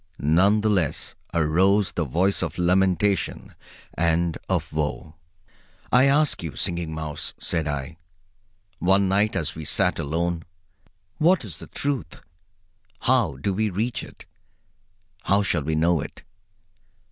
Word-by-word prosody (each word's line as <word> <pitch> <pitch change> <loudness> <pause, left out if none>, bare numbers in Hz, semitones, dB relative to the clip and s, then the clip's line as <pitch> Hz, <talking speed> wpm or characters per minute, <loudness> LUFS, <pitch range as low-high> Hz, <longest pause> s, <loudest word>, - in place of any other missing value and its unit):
None 95 +8 +3
the 110 - +1
less 90 -8 0 0.2
arose 90 +5 +2
the 85 - -2
voice 90 +8 +1
of - - -3
lamentation 95 +1 +1 0.4
and 85 0 +1
of - - -1
woe. 75 0 -3 0.8
"I 125 +3 +6
ask 145 +2 +3
you, 80 -4 -6
Singing 85 -2 -2
Mouse," 80 -2 -4
said 80 -3 -2
I, 75 +3 -4 0.8
one 95 +2 +3
night 100 +3 +2
as 75 -2 -2
we 80 - -7
sat - - +1
alone, 85 +3 -1 0.8
"what 170 -3 +3
is 85 -7 -6
the - - -11
Truth? 140 - -3 0.8
How - - +2
do 95 +9 -1
we 110 +3 0
reach 115 +6 -2
it? - - -13 1.0
How 100 +1 +3
shall 90 -5 +1
we 80 +2 -1
know 85 0 +2
it? 75 - -9
85 Hz, 135 wpm, -24 LUFS, 80-100 Hz, 1.0 s, I